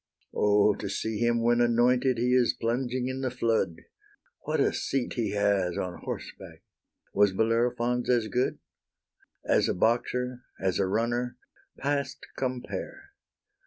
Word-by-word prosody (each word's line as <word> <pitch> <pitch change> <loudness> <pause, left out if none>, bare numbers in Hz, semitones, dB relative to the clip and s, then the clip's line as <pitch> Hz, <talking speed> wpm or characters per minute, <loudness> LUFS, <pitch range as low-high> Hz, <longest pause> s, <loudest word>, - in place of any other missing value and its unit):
O, 105 0 +4
to 100 - -5
see 110 +2 -2
him 120 0 +2
when 120 +1 +3
anointed 125 +2 +3
he 125 +2 +1
is 125 -2 +3
plunging 125 +2 -1
in 130 +1 -3
the 130 - 0
flood! 115 -8 0 0.6
What - - 0
a - - +3
seat 135 -2 -2
he 110 -4 -1
has 100 -3 +1
on 90 -1 -4
horseback! - - -8 0.5
was 100 -1 +4
Bellerophon's 120 +3 +1
as 120 -3 +3
good? 125 +5 0 0.9
As - - +3
a - - 0
boxer, 125 +4 0 0.2
as 95 -1 0
a 95 - +2
runner, 120 +4 -1 0.4
past 140 -1 -2
compare! 130 - -5
120 Hz, 135 wpm, -28 LUFS, 105-125 Hz, 0.9 s, O